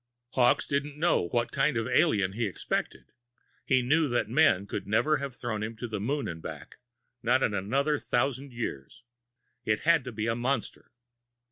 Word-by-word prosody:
Hawkes 125 -1 +3
didn't 140 +1 -2
know 160 - +2
what 120 +6 -1
kind 140 -1 +1
of 115 - 0
an - - -3
alien 105 - +3
he 115 +1 -1
expected. 95 - -4 0.5
He 130 -2 +3
knew 155 +5 +3
that 120 -3 0
men 115 -6 +3
could - - -5
never 150 +9 +2
have 140 -2 -5
thrown 110 -4 -4
him 110 +1 -4
to 120 +2 -5
the 110 -2 -4
moon 140 +7 -1
and 80 -1 -6
back, 80 -1 -9 0.4
not 125 +3 +2
in 105 - +1
another 135 +10 0
thousand 135 +2 -1
years. 115 - -6 0.6
It 105 -1 0
had 165 -3 +4
to 125 - -5
be 110 -1 -3
a 115 0 0
monster. 125 +1 -2
120 Hz, 180 wpm, -28 LUFS, 110-140 Hz, 0.6 s, had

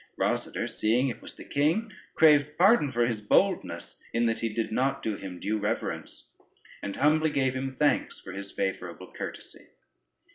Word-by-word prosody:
Rosader - - -1
seeing 120 +5 +1
it 120 - -6
was - - -9
the - - -10
king, 170 +10 0 0.2
craved 150 -1 +5
pardon 185 - +5
for 120 -1 +2
his 115 -3 -2
boldness, 105 - +1
in 115 0 +2
that 115 -1 +1
he 115 - -1
did 110 +1 -2
not 130 +4 0
do 110 -2 -1
him 95 -3 -8
due 110 +1 -1
reverence, 105 - -3 0.5
and 100 - -4
humbly 155 +3 +3
gave 130 -3 +1
him 135 +1 -2
thanks 145 +3 +1
for 95 - -9
his 100 +1 -6
favorable 90 -1 -4
courtesy. - - -8
120 Hz, 170 wpm, -28 LUFS, 105-145 Hz, 0.5 s, craved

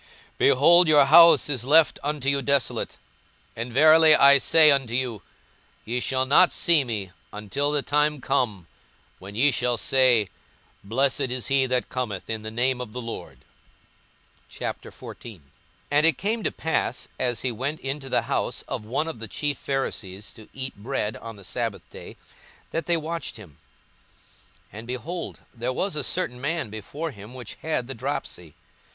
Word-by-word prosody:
42:013:035 - - -37
Behold, 170 +6 +6
your 150 -2 +6
house 165 +4 +7
is 135 -5 -1
left 155 +4 +4
unto 145 -1 -3
you 140 0 +2
desolate: 140 -3 -1 0.6
and 115 +2 -5
verily 155 +4 +6
I 140 0 +7
say 155 +2 +6
unto 130 -4 0
you, 125 -6 -2 0.6
Ye 120 +3 -2
shall 130 +1 -1
not 150 +7 +5
see 165 -5 +3
me, 105 -7 -5 0.2
until 105 +8 -3
the 145 -1 -1
time 150 0 +1
come 120 -9 -1 0.5
when 100 +2 -11
ye 140 +6 +4
shall 120 -1 0
say, 125 -7 +2 0.5
Blessed 130 +5 0
is 125 -1 -3
he 135 -1 +2
that 125 -1 -1
cometh 115 -6 -4
in 110 -1 -4
the 110 - -6
name 125 +3 -1
of 115 -4 -8
the 125 - -5
Lord. 115 -1 -8 1.1
42:014:001 110 -8 -8 0.5
And 145 +1 +3
it 160 -4 +3
came 220 +3 -2
to - - -1
pass, 160 - -2
as 120 -3 -1
he 130 - -1
went 135 +7 -4
into 135 0 -5
the - - +1
house - - -2
of - - -5
one 130 +9 -2
of 160 -8 -6
the 115 - -7
chief 145 +3 -3
Pharisees 105 -8 -4
to 110 -3 -15
eat 130 0 -5
bread 105 0 -3
on 115 -1 -9
the 100 - -14
sabbath - - -4
day, - - -11 0.5
that 165 - -3
they 170 -1 +2
watched 165 -2 -4
him. 90 -10 -15 1.1
42:014:002 105 - -8
And, 115 - -10
behold, 155 +8 -6
there 120 +1 -3
was 185 +6 -2
a 150 - -1
certain 125 -1 -1
man 145 -5 -2
before 145 +10 -6
him 105 +1 -12
which 125 -5 -8
had 155 -6 -2
the 135 - -6
dropsy. 110 - -5
130 Hz, 170 wpm, -24 LUFS, 115-150 Hz, 1.1 s, house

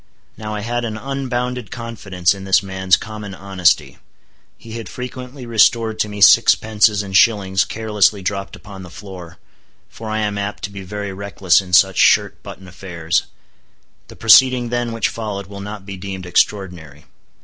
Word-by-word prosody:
Now 105 -1 -6
I 105 - -4
had 120 +2 -3
an 110 -2 -4
unbounded 125 -2 -4
confidence 105 -7 -2
in 100 -1 -10
this 95 +2 +2
man's 95 0 +1
common 105 -3 -8
honesty. 95 -2 0 0.6
He 115 - -13
had 115 -4 -7
frequently 125 +1 -8
restored 115 -1 +2
to 105 - 0
me 105 0 -7
sixpences 105 +1 +5
and 95 -1 -6
shillings 95 -2 +3
carelessly 105 -3 0
dropped 100 +1 -4
upon 100 -1 -12
the 90 - -10
floor, 90 -3 -11 0.5
for 110 -1 -9
I 110 - -2
am 105 -1 -2
apt 100 +1 -5
to 100 - -4
be 100 -1 -8
very 100 +1 -6
reckless 95 -2 +1
in 95 -1 -12
such 95 +1 +4
shirt - - +3
button 95 - -11
affairs. 85 -2 -3 0.8
The - - -13
proceeding 125 +2 +5
then 120 -1 -2
which 115 -2 0
followed 105 -3 -5
will 100 +1 -10
not 105 -1 -8
be 100 -1 -7
deemed 95 -1 -7
extraordinary. 90 -5 -1
100 Hz, 165 wpm, -19 LUFS, 95-115 Hz, 0.8 s, sixpences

